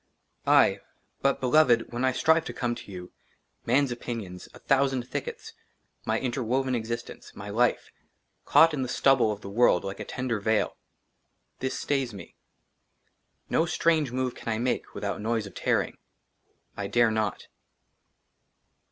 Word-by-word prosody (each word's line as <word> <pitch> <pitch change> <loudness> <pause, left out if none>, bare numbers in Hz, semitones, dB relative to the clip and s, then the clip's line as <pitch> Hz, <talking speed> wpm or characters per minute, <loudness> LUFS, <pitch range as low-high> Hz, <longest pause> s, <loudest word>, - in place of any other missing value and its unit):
aye; - - +5 0.4
BUT, 140 0 +2
BELOVED, 125 -3 +3
WHEN 120 +2 -2
I 130 - +3
STRIVE 160 +5 +3
TO - - -5
COME 120 -1 -1
TO 105 - -10
YOU, 90 -1 -8 0.6
man's 135 +2 +3
OPINIONS, 110 -7 -6
A - - -14
THOUSAND 135 -2 +1
THICKETS, - - -6 0.5
MY - - +1
INTERWOVEN 130 +1 -1
EXISTENCE, 115 0 -5
MY 100 +1 -7
LIFE, 120 +3 +1 0.6
CAUGHT 165 0 +6
IN 140 - -2
THE 130 - -1
STUBBLE 130 -3 +3
OF 105 0 -6
THE 100 - -8
WORLD 115 -4 +4
LIKE 100 0 -5
A - - -5
TENDER 125 -4 -2
VEIL, 110 +1 +1 0.8
THIS 130 0 -2
STAYS 135 -6 -1
ME. 95 - -11 1.2
NO 165 - +2
STRANGE 160 -5 +2
MOVE 130 0 -1
CAN - - -7
I 110 - 0
MAKE 125 +2 -2
WITHOUT - - -3
NOISE 110 0 -1
OF 100 - -10
TEARING. - - 0 0.8
I 100 - -4
DARE 120 +1 +3
NOT. 110 -2 -2
120 Hz, 150 wpm, -27 LUFS, 110-130 Hz, 1.2 s, CAUGHT